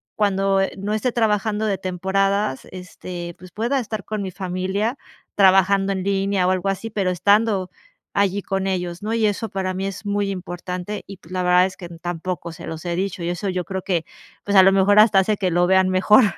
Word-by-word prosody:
cuando, 195 -1 +2
eh, 195 - 0
no 200 +2 -3
esté 220 +4 0
trabajando 215 -1 +1
de 200 -2 0
temporadas, 190 -2 0
este, 180 -1 -8
pues 185 0 -13
pueda 235 +8 0
estar 215 -5 -5
con 215 -1 -3
mi 190 - -4
familia 190 +6 -2 0.4
trabajando 195 0 +4
en 190 -1 -3
línea 195 -1 +1
o - - +3
algo 185 +1 0
así, 195 +4 -3
pero 195 -3 0
estando 200 +1 +2 0.4
allí 200 0 +1
con 195 0 -2
ellos, 180 -1 -3
¿no?, 220 +2 -2
y 230 -1 +2
eso 215 +2 -2
para 190 -1 -2
mí 190 +1 -2
es 195 +2 -7
muy 205 0 0
importante, 180 +2 -5
y 195 0 -9
pues 180 -1 -18
la 185 0 -1
verdad 180 0 +5
es 190 - -10
que 180 - -9
n 170 -1 -12
tampoco 175 0 -4
se - - -10
los 160 +1 -7
he 170 -1 -1
dicho. 190 -1 -2
Y 170 - -1
eso, 175 +3 -2
yo 180 -1 -2
creo 190 +2 -4
que, 175 -5 -1 0.4
pues, 205 - 0
a 190 - +9
lo 190 - +6
mejor, 200 +2 +5
hasta 210 -2 +6
hace 210 +3 +2
que 185 -3 0
lo 175 +1 +3
vean 190 0 +4
mejor. 190 +6 +5
190 Hz, 220 wpm, -22 LUFS, 180-205 Hz, 0.4 s, a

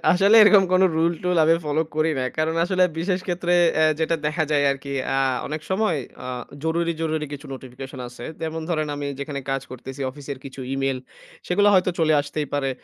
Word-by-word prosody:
আসলে 195 +4 +4
এরকম 205 -2 +7
কোনো 185 +1 +5
রুল-টুল 170 +2 +1
আমি 165 +1 +5
ফলো 150 +2 +1
করি 155 +1 +2
না। 130 - 0
কারণ 160 +1 0
আসলে 185 0 +1 0.2
বিশেষ 180 +2 0
ক্ষেত্রে 175 -1 -1 0.2
অ্যা 155 - +4 0.2
যেটা 165 +1 +1
দেখা 155 +1 0
যায় 145 -1 +3
আরকি, 140 0 -5 0.2
আ - - +2 0.3
অনেক 155 +2 -4
সময় 190 -3 +1 0.3
আ - - -5 0.4
জরুরি, 170 +1 0
জরুরি 155 -1 -1
কিছু 145 +1 -7
নোটিফিকেশন 130 +1 -9
আছে। 120 - -10 0.2
যেমন 160 0 -3
ধরেন 155 -3 0
আমি 145 0 -4
যেখানে 140 0 -4
কাজ 135 -1 -1
করতেছি, 130 +2 -9
অফিসের 140 0 -8
কিছু 135 0 -9
ই-মেইল, 135 -1 -1 0.5
সেগুলা 205 +3 +3
হয়তো 185 -1 +4
চলে 160 -2 +3
আসতেই 145 +1 -4
পারে। 135 -2 0
155 Hz, 185 wpm, -23 LUFS, 140-175 Hz, 0.5 s, এরকম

